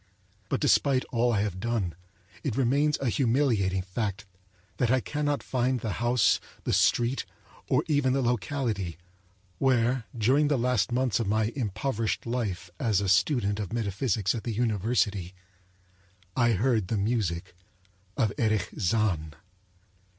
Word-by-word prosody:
But - - 0
despite 140 -3 +3
all 120 0 +2
I 105 -3 +1
have 100 -3 -2
done, 110 -5 -1 0.5
it 135 -7 -2
remains 140 +4 +2
an 130 -4 -1
humiliating 115 -8 +1
fact 100 +1 -3 0.5
that 120 - +1
I 130 +1 +4
cannot 145 +2 -2
find 130 0 0
the 110 -1 -3
house, 120 -3 +3 0.2
the - - -1
street, 120 +3 +2 0.5
or - - +3
even 145 -4 +2
the 135 0 +1
locality, 115 - -1 0.6
where, 125 -2 +2
during 130 +7 +3
the 145 -1 +2
last 125 -2 +1
months 125 -1 +1
of 115 - -1
my 110 +2 +1
impoverished 115 -1 -2
life 105 -7 -3
as 110 -5 +2
a 100 - -1
student 100 +1 +2
of 100 -4 -4
metaphysics 105 -2 0
at 115 - -5
the 115 - -3
university, 105 -4 0 1.0
I 120 -2 +3
heard 110 -1 +1
the 110 - -1
music 100 -6 -1 0.6
of 110 -7 +1
Erich 110 -5 +1
Zann. 95 -7 0
115 Hz, 140 wpm, -28 LUFS, 100-130 Hz, 1.0 s, I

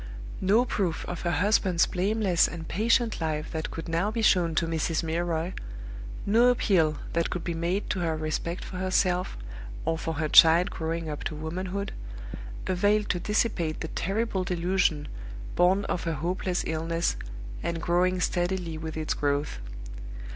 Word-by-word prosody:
No 210 +6 +4
proof 185 -9 -1
of 180 - -4
her 175 - 0
husband's 180 +1 +3
blameless 195 -1 +2
and 165 -1 -7
patient 225 +1 +2
life 155 -1 -2
that 160 -1 -3
could 165 - -6
now 170 +5 +1
be 225 +1 -2
shown 170 -6 +4
to 165 - +2
Mrs. 165 0 0
Milroy; 165 +1 -1 0.7
no 230 +4 +5
appeal 180 -11 +3 0.2
that 170 0 +1
could 180 - -3
be 170 - -2
made 170 +5 -1
to 190 - -1
her 165 -2 0
respect 155 +3 -3
for 185 - -7
herself, 185 - +1 0.5
or 165 0 0
for 165 -1 -3
her 155 +1 0
child 165 +3 +7
growing 165 0 -3
up 150 -1 -4
to 155 - -2
womanhood, 185 +6 -3 0.7
availed 205 +3 +2
to 175 - +1
dissipate 195 -6 0
the 160 - -3
terrible 195 +1 -1
delusion 175 -4 +1 0.5
born 185 +3 +4
of 175 - -2
her 165 - 0
hopeless 175 +4 -1
illness, 165 +1 0 0.5
and 170 -1 -2
growing 180 +2 +2
steadily 175 -2 -1
with 160 0 -5
its 155 -1 -1
growth. 145 - -1
175 Hz, 155 wpm, -27 LUFS, 160-190 Hz, 0.7 s, child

